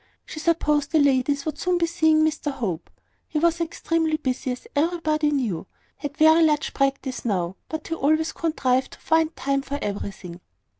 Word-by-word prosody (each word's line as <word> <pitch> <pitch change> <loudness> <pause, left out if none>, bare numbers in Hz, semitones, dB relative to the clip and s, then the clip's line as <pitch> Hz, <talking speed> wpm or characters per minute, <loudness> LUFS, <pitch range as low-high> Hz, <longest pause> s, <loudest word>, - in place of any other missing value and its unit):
She 310 - -8
supposed 300 -3 +1
the 320 - +3
ladies 280 0 +2
would 310 - -4
soon 360 -1 +1
be 340 - +2
seeing 315 -2 +3
Mr 310 -1 -1
Hope. 190 - -4 0.4
He - - -3
was 335 +2 +2
extremely 325 -1 0
busy, 255 -2 -2
as 250 - -6
everybody 310 -1 +1
knew 230 - -1 0.3
had 285 -1 -6
very 315 +1 +6
large 300 -1 +1
practice 275 -1 -1
now; 185 -5 -1
but 315 -1 -5
he 330 - -3
always 315 +1 +1
contrived 265 -6 0
to - - -14
find 320 0 +1
time 275 0 0
for 280 +1 -4
everything. 195 -4 -5
300 Hz, 170 wpm, -24 LUFS, 260-320 Hz, 0.4 s, very